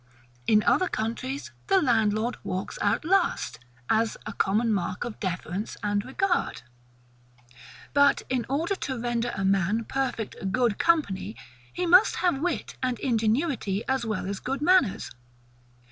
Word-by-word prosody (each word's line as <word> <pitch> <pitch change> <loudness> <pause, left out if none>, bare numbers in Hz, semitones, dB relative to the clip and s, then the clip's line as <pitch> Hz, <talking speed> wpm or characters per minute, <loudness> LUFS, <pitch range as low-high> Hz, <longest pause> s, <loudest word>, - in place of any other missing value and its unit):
In 215 -1 +5
other 370 - +3
countries, 255 +4 -3 0.2
the 390 -1 +5
landlord 225 - +2
walks 185 +1 -4
out 205 +8 +1
last, 365 - +1 0.3
as 225 0 +1
a - - -5
common 220 +4 +1
mark 185 -2 -2
of 240 -3 -6
deference 185 +2 -4
and 205 -1 0
regard. 355 - -1 1.3
But, 285 0 +4
in 255 -2 0
order 320 +8 0
to 265 -9 -4
render 240 0 -1
a 195 - -1
man 195 +3 +2
perfect 230 -7 -3
GOOD 235 -1 +1
COMPANY, 215 - +1 0.4
he 360 - -2
must 365 +5 +6
have 350 -7 +1
Wit 350 0 -2
and 255 -2 0
Ingenuity 225 - 0
as 265 -2 0
well 215 -5 -2
as 195 0 -3
good 270 +3 -3
manners. 345 - +3
235 Hz, 140 wpm, -27 LUFS, 205-285 Hz, 1.3 s, must